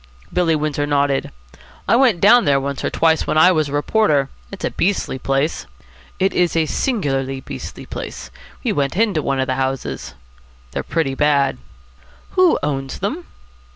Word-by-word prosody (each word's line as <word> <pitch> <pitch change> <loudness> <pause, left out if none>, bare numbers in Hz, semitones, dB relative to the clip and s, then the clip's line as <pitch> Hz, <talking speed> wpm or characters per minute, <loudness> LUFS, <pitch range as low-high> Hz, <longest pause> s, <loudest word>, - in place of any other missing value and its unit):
Billy 170 -3 +2
Windsor 150 -1 -1
nodded. 140 -1 +1 0.6
"I - - +4
went 240 -8 +4
down 230 +6 +6
there 140 -1 +3
once 140 0 -4
or - - 0
twice 160 -1 +2
when - - 0
I 180 +4 +7
was 155 -4 +1
a - - -7
reporter. 145 -3 +2 0.2
It's 195 - -5
a - - -1
beastly 180 -8 -1
place." 135 - -1 0.5
"It 190 +1 +1
is 175 -2 +1
a 165 -1 +3
singularly 135 - -1
beastly - - -8
place. - - -7 0.3
We - - +1
went 140 +3 -1
into 205 -7 +2
one 135 -2 -1
of 130 - +1
the 130 0 -2
houses." 130 - -3 0.6
"They're - - -3
pretty 160 -5 -1
bad." 140 0 +2 0.7
"Who 370 -2 +4
owns 135 -2 -2
them?" 290 - -4
150 Hz, 165 wpm, -19 LUFS, 135-185 Hz, 0.7 s, I